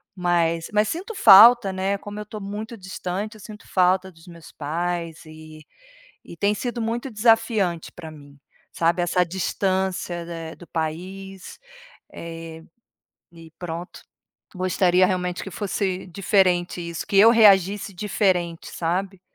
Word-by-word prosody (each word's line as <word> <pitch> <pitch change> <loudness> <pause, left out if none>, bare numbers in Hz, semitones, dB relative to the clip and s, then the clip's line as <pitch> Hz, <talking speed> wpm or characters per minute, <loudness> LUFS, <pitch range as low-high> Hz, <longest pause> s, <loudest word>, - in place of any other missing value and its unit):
mas 170 -2 0
mas 210 0 +3
sinto 370 - -5
falta, 230 - +8
né. 190 +1 -1
Como 205 +1 -9
eu 210 - -5
estou 210 +1 -9
muito 210 +3 -7
distante, 190 +2 -5
eu 215 - -14
sinto 215 +2 -12
falta 185 0 +2
dos 165 -2 -19
meus 170 -2 -14
pais 170 +2 -4
e 155 -1 -13 0.6
e - - -12
tem 200 +5 +1
sido 240 +2 -4
muito 235 +4 -3
desafiante 220 -6 +1
para 170 -2 -10
mim, 145 -2 -14 0.3
sabe, 170 +1 +1
essa 180 +1 +1
distância, 185 -1 -2
né, 165 -1 -7
do 175 - -15
país, 185 +4 -6 0.5
eh. 165 -1 -9 0.7
E 165 -1 -14
pronto, 175 0 -7 0.5
gostaria 185 0 +2
realmente 180 -1 -2
que 195 - -7
fosse 190 -1 -3
diferente 180 -1 +1
isso, 170 -1 -6
que 200 - -3
eu 225 +4 +8
reagisse 200 -3 +4
diferente, 180 -3 -1
sabe. 185 +3 -3
185 Hz, 135 wpm, -23 LUFS, 170-200 Hz, 0.7 s, falta